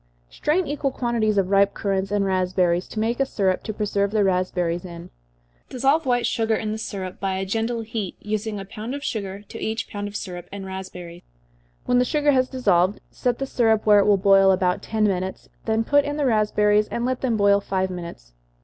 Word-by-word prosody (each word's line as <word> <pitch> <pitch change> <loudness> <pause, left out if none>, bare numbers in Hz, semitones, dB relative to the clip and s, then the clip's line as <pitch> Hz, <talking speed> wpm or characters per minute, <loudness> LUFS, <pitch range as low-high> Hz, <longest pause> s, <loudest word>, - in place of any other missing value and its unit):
_ - - -22
Strain 340 +5 +1
equal 285 -1 -1
quantities 235 -5 0
of 195 -1 +1
ripe 200 0 +4
currants 195 -2 -1
and 205 -1 +1
raspberries, 185 -2 +1
to 220 - -6
make 230 +3 0
a 275 - +3
syrup 190 -6 0
to 220 - -4
preserve 205 -1 -1
the 210 0 +1
raspberries 180 -2 0
in. 170 -2 -10 0.6
Dissolve 275 +4 +1
white 245 -1 +2
sugar 225 -1 +1
in 215 0 -3
the 220 - -4
syrup, 190 -4 -6
by 195 -1 -1
a 190 0 -2
gentle 225 +4 -1
heat, 220 -4 -4
using 215 0 -3
a 195 - -7
pound 225 +5 -6
of 285 - -7
sugar 200 -5 -4
to - - -10
each 220 +3 -2
pound 205 0 -5
of 205 - -9
syrup 180 -4 -6
and 195 -1 -7
raspberries. 180 -2 -8 0.6
When 245 0 +3
the 250 - +3
sugar 295 +2 +2
has 255 -2 +2
dissolved, 200 -7 +2
set 245 -1 -1
the 270 - -2
syrup 225 -4 +1
where 210 -1 +6
it 200 - +3
will 205 -1 +5
boil 195 0 +5
about 185 -1 +2
ten 220 -1 -1
minutes, 190 -2 -1 0.2
then 225 0 +1
put 285 +4 +3
in 290 +1 -3
the 290 - 0
raspberries, 210 -2 +2
and 235 - -3
let 255 0 -1
them 240 -4 0
boil 200 0 +4
five 190 -1 -1
minutes. 170 - -8
205 Hz, 215 wpm, -23 LUFS, 190-230 Hz, 0.6 s, where